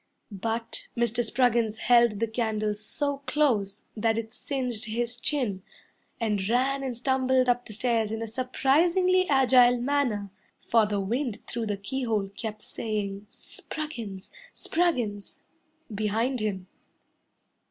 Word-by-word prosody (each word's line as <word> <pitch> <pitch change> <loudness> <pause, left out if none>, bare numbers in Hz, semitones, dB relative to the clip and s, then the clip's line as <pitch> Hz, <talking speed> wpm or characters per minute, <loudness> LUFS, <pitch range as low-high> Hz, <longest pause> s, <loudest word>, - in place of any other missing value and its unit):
But 225 +3 -4
Mr. 235 0 +2
Spruggins 235 -2 +2
held 235 -3 +4
the 230 - +2
candle 220 -2 -1
so 280 +7 -3
close 225 -10 +1
that 225 0 +1
it 225 0 -4
singed 250 -5 -3
his 235 +2 -2
chin, 235 -10 0 0.6
And 210 -4 0
ran 265 +3 +2
and 260 -3 -3
stumbled 260 0 +2
up 245 0 +2
the 215 - -7
stairs 225 -1 +1
in 220 - -2
a 225 - -3
surprisingly 335 - +2
agile 250 -3 +5
manner, 240 -7 0 0.3
For 225 -2 +3
the 205 -1 -1
wind 230 +3 -2
through 230 -2 -3
the 205 -1 -1
keyhole 215 -1 -2
kept 215 +1 -6
saying, 205 -2 -4
"Spruggins! 230 -14 -7 0.2
Spruggins!" 245 - -1 0.5
behind 220 +5 0
him. 200 -4 -2
230 Hz, 125 wpm, -27 LUFS, 215-255 Hz, 0.6 s, agile